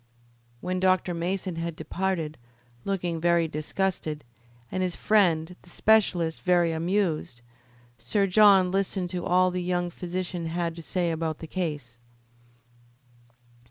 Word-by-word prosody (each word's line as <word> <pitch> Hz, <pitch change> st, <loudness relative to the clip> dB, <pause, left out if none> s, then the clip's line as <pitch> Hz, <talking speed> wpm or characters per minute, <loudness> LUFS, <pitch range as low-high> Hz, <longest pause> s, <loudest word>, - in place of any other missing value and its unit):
When 185 Hz, 0 st, -2 dB
Dr. 185 Hz, -1 st, +2 dB
Mason 180 Hz, +1 st, -3 dB
had 165 Hz, -1 st, -3 dB
departed, 165 Hz, -2 st, -3 dB, 0.5 s
looking 175 Hz, -4 st, -2 dB
very 170 Hz, -1 st, +3 dB
disgusted, 155 Hz, 0 st, -2 dB, 0.5 s
and 185 Hz, -, -2 dB
his 180 Hz, -1 st, -1 dB
friend, 180 Hz, -5 st, +2 dB
the 180 Hz, -, -19 dB
specialist, 180 Hz, -6 st, +2 dB
very 175 Hz, -2 st, +3 dB
amused, 165 Hz, -, -1 dB, 0.6 s
Sir 195 Hz, -, +1 dB
John 195 Hz, -2 st, +5 dB
listened 190 Hz, -2 st, -1 dB
to 180 Hz, -2 st, -3 dB
all 185 Hz, +1 st, +3 dB
the 180 Hz, 0 st, -2 dB
young 175 Hz, 0 st, -1 dB
physician 180 Hz, -1 st, -4 dB
had 170 Hz, 0 st, -2 dB
to 170 Hz, -, -8 dB
say 175 Hz, +1 st, -1 dB
about 160 Hz, -1 st, -2 dB
the -, -, -8 dB
case. 150 Hz, -9 st, -4 dB
175 Hz, 125 wpm, -26 LUFS, 165-185 Hz, 0.6 s, John